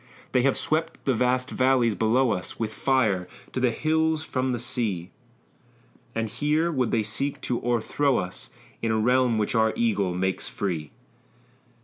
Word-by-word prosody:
They 125 - +3
have 135 +1 +2
swept 155 +1 -1
the 135 - +3
vast 125 +2 +1
valleys 130 -3 +3
below 115 +4 +2
us 90 - -4
With 110 -2 -2
fire, 110 -10 +1 0.2
to - - -2
the 125 -1 +3
hills 160 +4 +1
from 130 -4 -1
the 120 - -1
sea; 105 -7 -3 1.0
And 115 0 0
here 150 +8 0
would 130 -6 0
they 110 - +1
seek 135 +7 -3
to 120 - -2
o'erthrow 120 +3 +1
us 90 0 -4 0.3
In 115 - 0
a 110 - +2
realm 125 +1 +3
which 105 -1 0
our 110 -1 +3
eagle 100 -6 +1
makes 95 +1 -1
free!" 85 -7 -3
120 Hz, 160 wpm, -26 LUFS, 110-130 Hz, 1.0 s, They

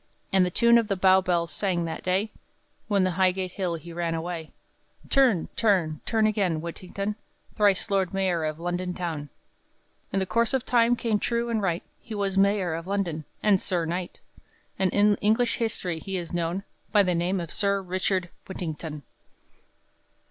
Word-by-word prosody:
And 190 -1 +5
the 180 - +1
tune 235 +5 +5
the 200 - 0
Bow 190 0 +5
bells 170 -2 0
sang 180 -4 -1
that 165 - -5
day, 190 +4 0 0.6
When 200 -3 +2
to 185 - +2
Highgate 185 0 +1
Hill 180 -2 -2
he 165 +1 -9
ran 170 -1 -1
away, 165 -1 -4 0.6
"Turn, 250 -11 +4
turn, 180 -9 +2
turn 220 -1 +2
again, 195 -7 +1
Whittington, 185 +5 -4 0.4
Thrice 205 -2 +3
Lord 190 -2 +1
Mayor 190 -4 0
of 155 0 -3
London 175 +1 -2
town," 160 -5 -4 0.8
In - - -1
the 190 - +1
course 230 +6 +1
of 260 -1 -1
time 240 -1 +4
came 225 -3 0
true 235 +1 -1
and 220 -2 0
right, 175 -3 -1 0.2
He 225 - -8
was 200 -1 -1
Mayor 195 -3 +2
of 165 +2 -5
London, 180 -6 -2 0.2
and 205 -3 +4
Sir 175 -4 -1
Knight; 175 +2 -4 0.6
And 190 -2 +2
in 205 0 +4
English 225 +3 +2
history 185 -7 -2
he 195 +3 -4
is 175 -2 -6
known, 175 +3 -1 0.3
By 210 -1 +5
the 180 -2 +1
name 175 +3 0
of 170 -2 -5
Sir 200 -1 +1
Richard 185 -1 -1 0.2
Whittington! 160 -5 -5
185 Hz, 170 wpm, -26 LUFS, 170-205 Hz, 0.8 s, And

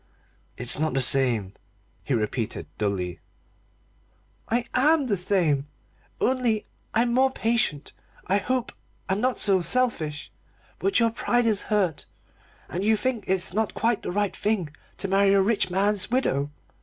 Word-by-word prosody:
"It's 125 +3 +2
not 155 -3 0
the - - +2
same," 120 -7 +1 0.5
he 135 - 0
repeated 110 +1 -2
dully. 90 -5 -2 1.3
"I 240 +1 +1
am 295 +3 +4
the 220 -5 +1
same 175 -7 +1 0.5
only 245 -5 +1 0.3
I'm 235 +1 +2
more 265 +2 +4
patient, 225 - -1 0.3
I 195 +2 +2
hope, 255 +3 -1 0.4
and 190 +2 0
not 255 0 +1
so 195 -3 +3
selfish. 170 -10 -1 0.5
But 390 - +2
your 230 -1 +3
pride 240 +1 +1
is 215 -3 +2
hurt, 190 -8 0 0.6
and 180 +3 -3
you 220 +1 +3
think 245 -3 -2
it's 185 -1 0
not 220 +1 -1
quite 230 -2 +1
the - - -4
right 205 +1 -1
thing 195 -8 -1 0.2
to 195 - -3
marry 195 +1 +4
a 195 - +5
rich 200 -3 +1
man's 195 +1 +1
widow. 145 - 0
200 Hz, 145 wpm, -25 LUFS, 150-230 Hz, 1.3 s, a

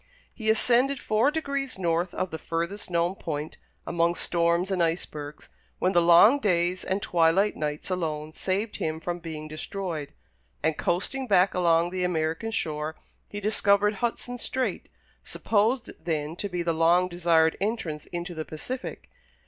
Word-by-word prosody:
He 220 -3 -2
ascended 250 +5 +3
four 215 +5 +2
degrees 280 -5 -2
north 175 0 0
of 185 - -2
the 160 - -5
furthest 170 +5 -3
known 170 +1 +1
point, 155 -5 -5 0.3
among 170 0 +1
storms 170 +2 +1
and 185 -2 +1
icebergs, 155 -3 -3 0.3
when 185 - +1
the 175 -2 +4
long 175 +11 +7
days 180 -4 +1
and 190 +1 -2
twilight 175 +4 +3
nights 150 +4 -3
alone 155 -4 -2
saved 195 +6 -2
him 160 0 -2
from 175 +2 -4
being 160 -2 -7
destroyed, 155 -1 -5 0.5
and, 160 0 +2
coasting 200 - -1
back 190 -2 +4
along 170 -1 +3
the 185 0 -2
American 165 +4 -1
shore, 155 -6 -2 0.3
he 205 - -5
discovered 205 0 +3
Hudson 245 +1 -2
Strait, 260 +2 -2 0.3
supposed 225 +3 0
then 155 -1 -2
to 205 - -3
be 175 -2 -2
the 170 -1 +1
long 170 +3 +4
desired 165 -2 +3
entrance 195 -8 -2
into 175 +1 -5
the 160 -1 -4
Pacific. 250 +13 -6
175 Hz, 150 wpm, -27 LUFS, 165-205 Hz, 0.5 s, long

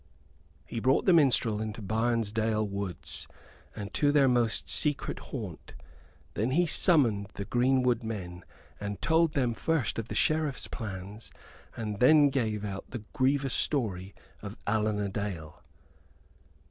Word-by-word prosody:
He 115 - -5
brought 130 +4 +2
the 185 - +5
minstrel 125 -8 +3
into 110 +1 -5
Barnesdale 110 0 0
woods 100 -4 -4 0.5
and 100 -1 -7
to 145 -1 +3
their 145 -2 +4
most 120 -3 +1
secret 145 -2 -1
haunt. 105 - -8 0.6
Then 110 +4 -1
he 170 +7 +3
summoned 125 - +4
the 100 - -5
greenwood 125 0 +2
men 95 -6 -6 0.4
and 100 -1 -5
told 165 -1 +2
them 125 -4 +1
first 145 -2 -1
of 115 - -5
the - - -6
Sheriff's 155 -3 +1
plans 105 -1 -7 0.5
and 105 -3 -4
then 145 +2 +6
gave 110 -6 -1
out 100 -1 -6
the 120 -4 -7
grievous 135 0 +1
story 100 -9 -1 0.3
of 100 +2 -8
Allan 110 -1 +1
a 100 - -1
Dale. 95 -6 -5
115 Hz, 135 wpm, -29 LUFS, 105-135 Hz, 0.6 s, then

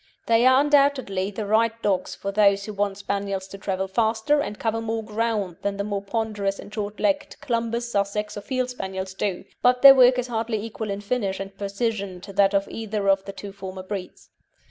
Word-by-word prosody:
They 230 +2 +4
are 260 +1 +6
undoubtedly 275 -10 +2
the 210 +1 -5
right 225 +2 +2
dogs 195 -3 0
for 200 - -4
those 200 -1 +3
who 215 - -6
want 200 -1 -1
Spaniels 200 -1 -3
to 195 - -8
travel 190 -1 -2
faster 220 +7 +1
and 210 -8 -3
cover 225 0 -1
more 225 0 -2
ground 215 -4 -2
than 200 0 -2
the 200 - -1
more 200 -1 -2
ponderous 205 -2 -2
and 205 - -11
short 210 -1 -4
legged 290 -1 0
Clumbers, 235 -3 -1
Sussex, 205 +1 -1
or 205 - -5
Field 255 +2 -2
Spaniels 190 -4 -5
do, 190 -1 -2 0.2
but 250 +1 +3
their 275 -1 +12
work 255 -1 +6
is 250 - 0
hardly 225 -2 -2
equal 220 -1 -5
in 200 0 -3
finish 200 -3 -1
and 195 0 -7
precision 200 -1 -3
to 200 +1 -10
that 200 0 +3
of 195 0 +1
either 215 -2 -3
of 195 0 +3
the 195 - -5
two 195 +1 -8
former 190 -1 -8
breeds. 190 -1 -7
205 Hz, 205 wpm, -24 LUFS, 195-230 Hz, 0.2 s, their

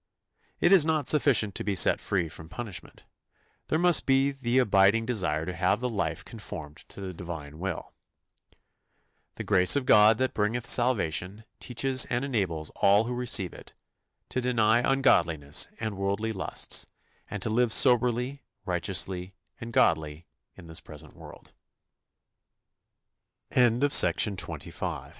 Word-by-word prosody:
" - - -42
It 175 - +4
is 190 -5 +6
not 155 -3 -1
sufficient 130 -9 +3
to - - -4
be 100 -1 -2
set 90 - +4
free 90 -4 -1
from 80 0 -10
punishment, 95 -2 -8 0.6
there 155 - 0
must 175 -1 +3
be 135 +1 +2
the 130 -2 -2
abiding 105 -2 +3
desire 95 -10 -2
to 90 - -5
have 90 +4 0
the 125 - -2
life 110 -5 -4
conformed 75 -1 -9
to - - -14
the 95 -1 -6
Divine 80 -4 -9
will. 95 -1 -6 1.4
"The - - -6
grace 90 +1 +4
of 140 -2 -1
God 105 -2 +5
that 130 +1 -2
bringeth 110 +3 -2
salvation" 105 -4 +1 0.2
teaches 130 +2 +1
and 125 +2 -3
enables 90 - -3
all 100 +2 +3
who 120 +2 -5
receive 120 -7 0
it - - -14 0.5
"to 130 - -2
deny 120 -2 +2
ungodliness 85 - +1
and 110 -2 -4
worldly 100 +3 -2
lusts, 95 - -1 0.4
and 105 - -6
to 110 - -3
live 120 +1 +1
soberly, 125 +2 +2 0.2
righteous 90 0 0
110 Hz, 120 wpm, -26 LUFS, 90-125 Hz, 1.4 s, is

